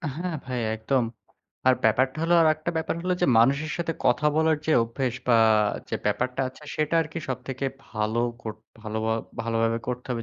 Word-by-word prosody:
হ্যাঁ, 175 Hz, +1 st, -3 dB
ভাই 125 Hz, -1 st, -3 dB, 0.2 s
একদম। 125 Hz, +4 st, +1 dB, 0.6 s
আর 130 Hz, -, +7 dB
ব্যাপারটা 125 Hz, +5 st, +3 dB
হলো 170 Hz, +1 st, +3 dB
আরেকটা 155 Hz, +1 st, +2 dB
ব্যাপার 160 Hz, -, -1 dB
হলো 180 Hz, 0 st, 0 dB
যে -, -, +5 dB
মানুষের 140 Hz, +6 st, +3 dB
সাথে 170 Hz, -1 st, -1 dB
কথা 125 Hz, +5 st, +3 dB
বলার 160 Hz, -1 st, +3 dB
যে 160 Hz, -, +3 dB
অভ্যাস 120 Hz, +2 st, -2 dB
বা 120 Hz, -, +6 dB, 0.5 s
যে -, -, -1 dB
ব্যাপারটা 130 Hz, +1 st, 0 dB
আছে 130 Hz, +4 st, -15 dB
সেটা 155 Hz, +1 st, 0 dB
আরকি 160 Hz, +2 st, -6 dB
সবথেকে 130 Hz, +1 st, -4 dB, 0.2 s
ভালো 110 Hz, +1 st, -1 dB, 0.2 s
করতে 110 Hz, 0 st, -7 dB, 0.2 s
ভাল 110 Hz, 0 st, -6 dB, 0.5 s
ভালোভাবে 115 Hz, 0 st, 0 dB
করতে 125 Hz, 0 st, -4 dB
হবে। 120 Hz, -2 st, -2 dB
130 Hz, 170 wpm, -26 LUFS, 115-155 Hz, 0.6 s, আর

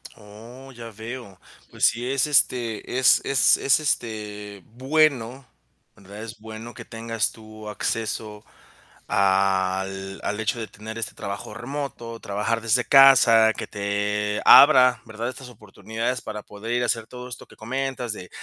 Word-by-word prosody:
Oh, 115 Hz, +5 st, -13 dB
ya 120 Hz, -2 st, -10 dB
veo. 110 Hz, -2 st, -9 dB, 0.3 s
Pues -, -, 0 dB
sí, 120 Hz, +2 st, -2 dB
es, 135 Hz, +1 st, +1 dB
este, 125 Hz, -4 st, 0 dB
es 130 Hz, -1 st, +5 dB
es 135 Hz, -1 st, +3 dB
es 135 Hz, -, +2 dB
este, 105 Hz, -, -4 dB
bueno, 130 Hz, -, 0 dB, 0.5 s
¿verdad? 100 Hz, +2 st, -11 dB
Es 115 Hz, -1 st, -9 dB
bueno 110 Hz, +2 st, -9 dB
que -, -, -11 dB
tengas 115 Hz, -2 st, -3 dB
tú 110 Hz, -1 st, -12 dB
acceso 105 Hz, -1 st, -4 dB, 0.6 s
al 95 Hz, 0 st, 0 dB
al 105 Hz, -, -3 dB
hecho 110 Hz, +2 st, -1 dB
de 110 Hz, -, -5 dB
tener 110 Hz, +3 st, -9 dB
este 115 Hz, -, -5 dB
trabajo 100 Hz, 0 st, -6 dB
remoto, 120 Hz, -2 st, -6 dB
trabajar 105 Hz, +3 st, -2 dB
desde 115 Hz, +2 st, +1 dB
casa, 120 Hz, -5 st, +7 dB
que -, -, -4 dB
te 105 Hz, 0 st, -2 dB
abra, 125 Hz, -5 st, +7 dB
¿verdad? 110 Hz, +2 st, -5 dB
Estas 130 Hz, 0 st, -10 dB
oportunidades 115 Hz, +2 st, -5 dB
para 105 Hz, -1 st, -7 dB
poder 105 Hz, +3 st, -7 dB
ir 120 Hz, 0 st, +1 dB
a -, -, +1 dB
hacer 115 Hz, -1 st, -2 dB
todo 125 Hz, 0 st, -10 dB
esto 125 Hz, -, -9 dB
que -, -, -18 dB
comentas, 130 Hz, 0 st, -4 dB
de 90 Hz, -3 st, -10 dB
115 Hz, 150 wpm, -23 LUFS, 105-125 Hz, 0.6 s, casa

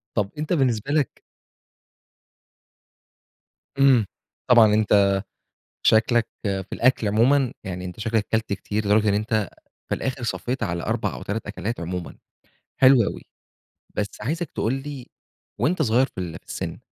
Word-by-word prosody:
طب 100 Hz, -3 st, +1 dB
أنت 155 Hz, +4 st, -2 dB
بالنسبة 130 Hz, -3 st, +1 dB
لك 150 Hz, -3 st, 0 dB, 2.6 s
إمم، 130 Hz, -6 st, +5 dB, 0.4 s
طبعًا 115 Hz, -4 st, +6 dB
أنت 100 Hz, -2 st, +4 dB, 0.7 s
شكلَك 115 Hz, +1 st, +4 dB, 0.2 s
في 95 Hz, -2 st, -2 dB
الأكل 120 Hz, -3 st, +2 dB
عمومًا، 125 Hz, +4 st, +3 dB
يعني 90 Hz, -1 st, -5 dB
أنت 90 Hz, +4 st, -8 dB
شكلَك 110 Hz, -1 st, 0 dB
أكلت 110 Hz, -2 st, 0 dB
كتير 105 Hz, +2 st, -2 dB
لدرجة 105 Hz, +1 st, +3 dB
إن 100 Hz, -, +3 dB
أنت 110 Hz, -2 st, 0 dB, 0.4 s
في -, -, 0 dB
الآخر 130 Hz, -1 st, -3 dB
صفّيت 125 Hz, +1 st, -3 dB
على 85 Hz, -4 st, -2 dB
4 -, -, -1 dB
أو -, -, -8 dB
3 105 Hz, +2 st, -4 dB
أكلات 100 Hz, +1 st, -4 dB
عمومًا. 90 Hz, +1 st, -5 dB, 0.6 s
حلو 130 Hz, -2 st, +6 dB
أوي، -, -, -4 dB, 0.7 s
بس 105 Hz, -1 st, 0 dB
عايزك 160 Hz, +7 st, -2 dB
تقول 115 Hz, -, -1 dB
لي 135 Hz, -1 st, -6 dB, 0.5 s
وأنت 170 Hz, +1 st, +1 dB
صغير 125 Hz, 0 st, +3 dB
في 95 Hz, -, -7 dB
ال 85 Hz, -3 st, -5 dB
في -, -, -41 dB
السن، -, -, -5 dB
110 Hz, 140 wpm, -24 LUFS, 100-130 Hz, 2.6 s, طبعًا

